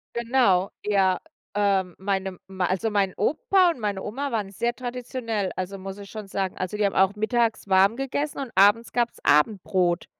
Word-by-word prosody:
Genau, 235 Hz, -6 st, +2 dB
ja. 195 Hz, -3 st, +2 dB, 0.4 s
Ähm, 195 Hz, -3 st, +1 dB
meine 190 Hz, -1 st, -2 dB
mei 190 Hz, -1 st, -2 dB
also 190 Hz, +5 st, 0 dB
mein 200 Hz, -3 st, +1 dB
Opa 350 Hz, -, +3 dB
und 260 Hz, -, -9 dB
meine 205 Hz, -3 st, -2 dB
Oma 270 Hz, +7 st, -4 dB
waren 205 Hz, -4 st, -2 dB
sehr 235 Hz, +4 st, -1 dB
traditionell, 245 Hz, -5 st, -3 dB
also 185 Hz, +1 st, -4 dB
muss 195 Hz, +1 st, -7 dB
ich 200 Hz, -, -10 dB
schon 215 Hz, -2 st, -8 dB
sagen. 190 Hz, -1 st, -3 dB
Also 185 Hz, +3 st, -3 dB
die 210 Hz, -, +2 dB
haben 195 Hz, -, 0 dB
auch 190 Hz, +2 st, +3 dB
mittags 225 Hz, 0 st, 0 dB
warm 195 Hz, +3 st, +4 dB
gegessen 280 Hz, +2 st, -3 dB
und 265 Hz, -4 st, -5 dB
abends 205 Hz, +4 st, +4 dB
gab's 240 Hz, -1 st, -1 dB
Abendbrot, 180 Hz, +1 st, +2 dB
205 Hz, 175 wpm, -25 LUFS, 190-235 Hz, 0.4 s, warm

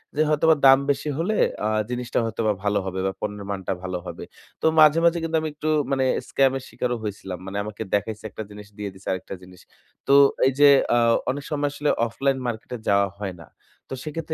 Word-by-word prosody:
যে 150 Hz, -, +2 dB
হয়তোবা 155 Hz, +1 st, +4 dB
দাম 135 Hz, 0 st, +8 dB
বেশি 140 Hz, +2 st, 0 dB
হলে 190 Hz, +7 st, 0 dB, 0.3 s
আ -, -, +1 dB, 0.2 s
জিনিসটা 125 Hz, 0 st, -2 dB
হয়তোবা 110 Hz, -1 st, 0 dB
ভালো 100 Hz, 0 st, +1 dB
হবে 95 Hz, 0 st, -4 dB
বা 95 Hz, -, 0 dB
পণ্যের 105 Hz, -1 st, -4 dB
মানটা 95 Hz, -2 st, -4 dB
ভালো 90 Hz, -1 st, -3 dB
হবে। -, -, -7 dB, 0.4 s
তো -, -, -2 dB
মাঝে, 155 Hz, +1 st, +7 dB
মাঝে 170 Hz, 0 st, +4 dB
কিন্তু 165 Hz, 0 st, -2 dB
আমি 155 Hz, -, -2 dB
একটু 150 Hz, +1 st, -6 dB, 0.2 s
মানে 135 Hz, -1 st, +1 dB, 0.2 s
স্কাম 135 Hz, -1 st, +3 dB
এর 135 Hz, -, -8 dB
শিকারও 125 Hz, -1 st, -2 dB
হয়েছিলাম। 95 Hz, -3 st, -5 dB
মানে 95 Hz, +1 st, -5 dB
আমাকে 105 Hz, +1 st, -8 dB
দেখাইছে 105 Hz, +2 st, -1 dB
একটা 110 Hz, -, -7 dB
জিনিস, 105 Hz, 0 st, -11 dB
দিয়ে 105 Hz, -1 st, -4 dB
দিছে 95 Hz, +1 st, -16 dB
আরেকটা 95 Hz, +1 st, -4 dB
জিনিস। 90 Hz, 0 st, -15 dB, 0.5 s
তো -, -, +4 dB, 0.3 s
এই -, -, +3 dB
যে 145 Hz, 0 st, +8 dB, 0.3 s
আ -, -, +4 dB, 0.3 s
অনেক 140 Hz, +2 st, -2 dB
সময় 145 Hz, -1 st, 0 dB
আসলে 145 Hz, 0 st, -1 dB, 0.2 s
অফলাইন 135 Hz, +3 st, -1 dB
মার্কেট 110 Hz, 0 st, -5 dB
এ -, -, -5 dB
যাওয়া 100 Hz, 0 st, +4 dB
হয় 95 Hz, -3 st, -4 dB
না। -, -, -13 dB, 0.4 s
তো -, -, -5 dB
সেক্ষেত্রে 160 Hz, +1 st, -5 dB
115 Hz, 210 wpm, -24 LUFS, 100-145 Hz, 0.5 s, দাম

